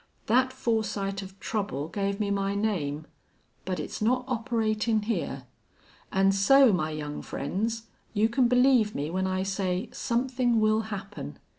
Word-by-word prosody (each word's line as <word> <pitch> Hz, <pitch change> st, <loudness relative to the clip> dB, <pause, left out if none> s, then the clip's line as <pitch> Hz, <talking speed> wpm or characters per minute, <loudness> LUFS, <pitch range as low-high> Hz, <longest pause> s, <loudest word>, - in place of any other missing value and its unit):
That 255 Hz, +3 st, +3 dB
foresight 215 Hz, -6 st, -1 dB
of 195 Hz, 0 st, -11 dB
trouble 200 Hz, -9 st, -2 dB
gave 200 Hz, +3 st, -2 dB
me 205 Hz, -1 st, 0 dB
my 200 Hz, 0 st, 0 dB
name.... 160 Hz, -8 st, -1 dB, 0.6 s
But 185 Hz, -3 st, -2 dB
it's 150 Hz, -, -5 dB
not 250 Hz, +3 st, +2 dB
operatin' 225 Hz, -3 st, 0 dB
here.... 225 Hz, +2 st, -2 dB, 0.7 s
An' 195 Hz, 0 st, +4 dB
so, 230 Hz, +5 st, +6 dB
my 155 Hz, -4 st, 0 dB
young 150 Hz, -1 st, -5 dB
friends, 220 Hz, +10 st, -3 dB, 0.3 s
you 215 Hz, +1 st, +3 dB
can 240 Hz, +2 st, +2 dB
believe 250 Hz, -3 st, +4 dB
me 145 Hz, +3 st, -2 dB
when 190 Hz, +1 st, 0 dB
I 185 Hz, 0 st, 0 dB
say 195 Hz, +1 st, -2 dB
somethin' 245 Hz, -1 st, +1 dB
will 215 Hz, 0 st, +3 dB
happen. 195 Hz, -, -6 dB
210 Hz, 145 wpm, -28 LUFS, 190-230 Hz, 0.7 s, so